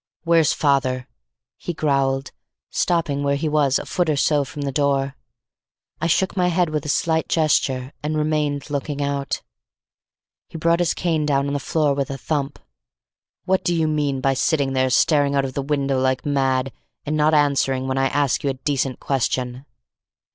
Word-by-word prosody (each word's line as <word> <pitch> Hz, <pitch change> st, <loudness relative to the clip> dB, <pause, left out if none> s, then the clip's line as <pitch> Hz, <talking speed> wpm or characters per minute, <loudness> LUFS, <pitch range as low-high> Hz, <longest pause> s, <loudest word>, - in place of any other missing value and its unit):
"Where's 165 Hz, -2 st, +4 dB
father?" 130 Hz, -3 st, +1 dB, 0.5 s
he 175 Hz, -, -5 dB
growled, 135 Hz, -2 st, 0 dB, 0.4 s
stopping 165 Hz, -5 st, 0 dB
where 140 Hz, 0 st, +1 dB
he 150 Hz, +3 st, -2 dB
was 145 Hz, -3 st, +2 dB
a -, -, -6 dB
foot 175 Hz, -3 st, 0 dB
or 150 Hz, -, +2 dB
so 145 Hz, +1 st, +2 dB
from 145 Hz, +2 st, -7 dB
the 140 Hz, -, -2 dB
door. 140 Hz, -1 st, 0 dB, 0.9 s
I -, -, +1 dB
shook 190 Hz, +4 st, +1 dB
my 180 Hz, -2 st, +2 dB
head 175 Hz, -2 st, +1 dB
with 150 Hz, -2 st, -2 dB
a -, -, -3 dB
slight 160 Hz, +2 st, +1 dB
gesture 135 Hz, -4 st, +1 dB
and 155 Hz, +1 st, -2 dB
remained 150 Hz, -2 st, -1 dB
looking 145 Hz, 0 st, -2 dB
out. 140 Hz, -1 st, -2 dB, 1.1 s
He -, -, -8 dB
brought 170 Hz, +1 st, +2 dB
his 175 Hz, -2 st, +1 dB
cane 160 Hz, -3 st, 0 dB
down 140 Hz, -1 st, +2 dB
on 140 Hz, -, -2 dB
the 145 Hz, -, -1 dB
floor 150 Hz, +1 st, +1 dB
with 140 Hz, -1 st, -2 dB
a 135 Hz, -, -4 dB
thump. 145 Hz, 0 st, -2 dB, 0.9 s
"What 190 Hz, 0 st, +1 dB
do 175 Hz, -, +1 dB
you 160 Hz, -1 st, +1 dB
mean 145 Hz, -3 st, 0 dB
by 135 Hz, +1 st, +2 dB
sitting 135 Hz, 0 st, +1 dB
there 130 Hz, 0 st, +2 dB
staring 140 Hz, +2 st, +3 dB
out 140 Hz, -1 st, +2 dB
of 130 Hz, -, -5 dB
the 140 Hz, -, -2 dB
window 140 Hz, -1 st, 0 dB
like 130 Hz, -1 st, 0 dB
mad 135 Hz, -2 st, +1 dB, 0.3 s
and 150 Hz, -, -1 dB
not 155 Hz, +1 st, +3 dB
answering 135 Hz, -3 st, +2 dB
when 130 Hz, 0 st, -1 dB
I 135 Hz, -, +3 dB
ask 145 Hz, -1 st, 0 dB
you 140 Hz, -, +1 dB
a 135 Hz, -, -2 dB
decent 135 Hz, -1 st, -2 dB
question?" 130 Hz, -1 st, -2 dB
140 Hz, 185 wpm, -22 LUFS, 135-155 Hz, 1.1 s, Where's